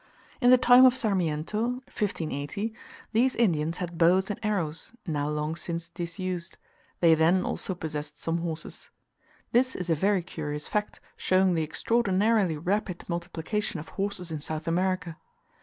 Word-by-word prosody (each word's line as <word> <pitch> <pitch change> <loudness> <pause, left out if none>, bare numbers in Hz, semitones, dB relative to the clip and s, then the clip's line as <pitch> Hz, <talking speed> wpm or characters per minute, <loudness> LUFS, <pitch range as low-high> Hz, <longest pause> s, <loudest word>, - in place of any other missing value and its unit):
In 245 - +5
the 255 - +8
time 245 +1 +7
of 255 -1 +6
Sarmiento 185 -5 0 0.3
(1580), 195 +2 -3 0.4
these 250 +4 +3
Indians 165 -7 +1
had 175 -2 -5
bows 185 +4 +4
and 205 - -5
arrows, 190 -5 -2
now 150 -4 -1
long 150 +1 -2
since 170 0 -4
disused; 175 0 -5 0.4
they 165 -2 +7
then 165 +4 +3
also 190 - -2
possessed 150 -3 -5
some 165 +1 -1
horses. 165 -2 -5 0.6
This 255 +2 +2
is 180 -2 -2
a - - +6
very 190 +3 +1
curious 150 -3 -4
fact, 210 0 -2 0.2
showing 185 0 +3
the 165 - +1
extraordinarily 200 +1 +1
rapid 185 +2 -2
multiplication 175 +4 -3
of 150 - -9
horses 195 -3 -4
in 155 - -3
South 155 +2 -5
America. 175 -1 0
175 Hz, 145 wpm, -27 LUFS, 160-205 Hz, 0.6 s, the